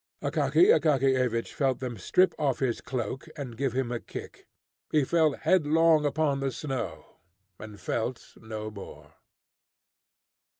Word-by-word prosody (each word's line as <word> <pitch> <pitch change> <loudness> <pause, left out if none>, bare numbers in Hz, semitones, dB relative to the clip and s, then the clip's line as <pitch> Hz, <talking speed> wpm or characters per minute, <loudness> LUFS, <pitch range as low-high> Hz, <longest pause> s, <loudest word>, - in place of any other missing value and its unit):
Akaky 370 - +3
Akakiyevich 130 -5 +1
felt 135 -3 +1
them 125 -2 -4
strip 185 - +3
off 140 -4 +1
his 130 -4 -1
cloak, 130 0 -4
and 130 -5 -6
give 135 0 -1
him 130 -2 -1
a 120 - -2
kick. - - -10 0.4
He 150 -2 +3
fell 160 +1 +2
headlong 160 -2 +3
upon 145 -1 0
the 135 -1 -1
snow, 135 -2 -5 0.4
and 105 -1 -10
felt 115 +6 -3
no 110 -1 -6
more. 100 -2 -11
135 Hz, 130 wpm, -28 LUFS, 120-150 Hz, 0.4 s, Akaky